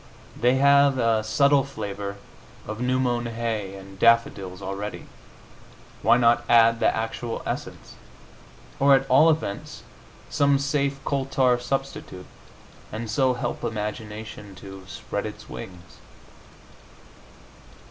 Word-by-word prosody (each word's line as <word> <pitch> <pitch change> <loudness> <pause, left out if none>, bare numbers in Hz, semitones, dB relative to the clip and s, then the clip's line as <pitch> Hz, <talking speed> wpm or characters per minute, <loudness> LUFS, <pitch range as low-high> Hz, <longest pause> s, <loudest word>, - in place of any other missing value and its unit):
They 125 +2 +2
have 140 0 +5
a 115 -3 +2
subtle 140 +5 +3
flavor 100 -5 -5 0.5
of 110 +2 -6
new 130 +1 +1
mown 120 -2 0
hay 115 -4 -3
and 95 0 -12
daffodils 105 -6 +2
already; 100 +2 -5 1.0
why - - +5
not 120 -1 +3
add 115 -1 +5
the - - +3
actual 115 +1 -2
essence, - - -6 0.9
or 140 0 +6
at 135 0 0
all 155 +5 +7
events 150 -11 -3 0.4
some 140 -1 +2
safe 140 0 0
coal 135 -2 -1
tar 130 -2 +2
substitute, 125 -7 -4 0.7
and 110 0 -5
so 130 0 +2
help 120 - -4
imagination 105 -2 -5
to 95 0 -11
spread 90 - -5
its - - -10
wings? 90 -2 -10
115 Hz, 115 wpm, -25 LUFS, 105-135 Hz, 1.0 s, all